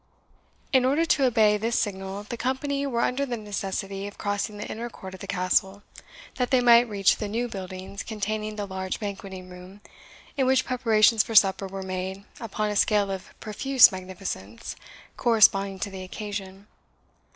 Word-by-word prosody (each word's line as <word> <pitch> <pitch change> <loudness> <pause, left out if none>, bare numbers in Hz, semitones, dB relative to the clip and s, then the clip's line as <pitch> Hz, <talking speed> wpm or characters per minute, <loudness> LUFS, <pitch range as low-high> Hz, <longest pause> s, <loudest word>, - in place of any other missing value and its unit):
In 260 -1 +5
order 285 +6 +2
to 285 -4 +3
obey 220 -4 +4
this 225 +2 -1
signal, 195 0 -3
the 210 - -6
company 275 +3 -1
were 235 -3 -1
under 255 +4 0
the 250 -4 -3
necessity 200 -1 -4
of 205 - -11
crossing 205 +1 -2
the 205 - -5
inner 235 +2 -5
court 190 -4 -10
of 190 - -10
the - - -8
Castle, 190 +1 0 0.5
that 250 -1 0
they 260 - +4
might 240 -1 +6
reach 200 -2 +3
the 210 - -3
new 230 +4 -2
buildings 190 -1 -7
containing 215 0 -3
the 205 -1 -3
large 190 -1 -4
banqueting 195 -3 -6
room, 180 +2 -12 0.6
in 265 -2 +2
which 265 0 +3
preparations 225 -3 +4
for 225 - -5
supper 195 -1 +5
were 195 0 -6
made 190 +1 -4 0.2
upon 215 -2 -2
a - - -3
scale 205 -1 +2
of 190 -1 -8
profuse 255 +4 +5
magnificence, 185 - -6 0.4
corresponding 200 -4 +4
to 200 - -4
the 190 -1 -7
occasion. 195 0 -7
205 Hz, 170 wpm, -26 LUFS, 190-235 Hz, 0.6 s, might